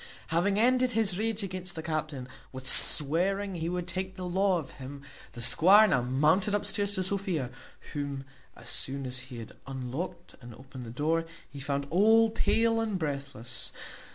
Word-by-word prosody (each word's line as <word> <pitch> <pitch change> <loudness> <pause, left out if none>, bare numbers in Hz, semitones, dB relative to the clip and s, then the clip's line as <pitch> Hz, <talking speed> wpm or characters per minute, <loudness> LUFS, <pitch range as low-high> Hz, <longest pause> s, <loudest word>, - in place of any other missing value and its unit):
Having 180 +5 0
ended 255 +1 +2
his 205 -4 0
rage 220 -1 -2
against 185 -2 -7
the 160 - -7
captain, 155 -5 -4 0.2
with 130 0 -9
swearing 185 +10 +6
he 165 -1 -4
would 180 0 -4
take 185 +1 -5
the 185 -1 -7
law 190 +1 +1
of 155 -5 -7
him, 140 +2 -9 0.3
the 120 - -3
squire 190 - +6
now 135 -10 +1
mounted 155 +11 +1
upstairs 205 0 0
to 185 - -1
Sophia, 185 - -3 0.4
whom, 140 -2 -5 0.3
as - - -14
soon 135 0 -3
as 125 0 -2
he 125 - -9
had 115 -2 -9 0.2
unlocked 135 +7 -7
and 120 -1 -12
opened 130 -1 -11
the - - -8
door, 155 +7 -1 0.2
he 140 - -12
found 140 0 -3
all 220 +5 +4
pale 225 +1 +1
and 215 -4 -2
breathless. 140 -6 -5
165 Hz, 170 wpm, -28 LUFS, 135-195 Hz, 0.4 s, swearing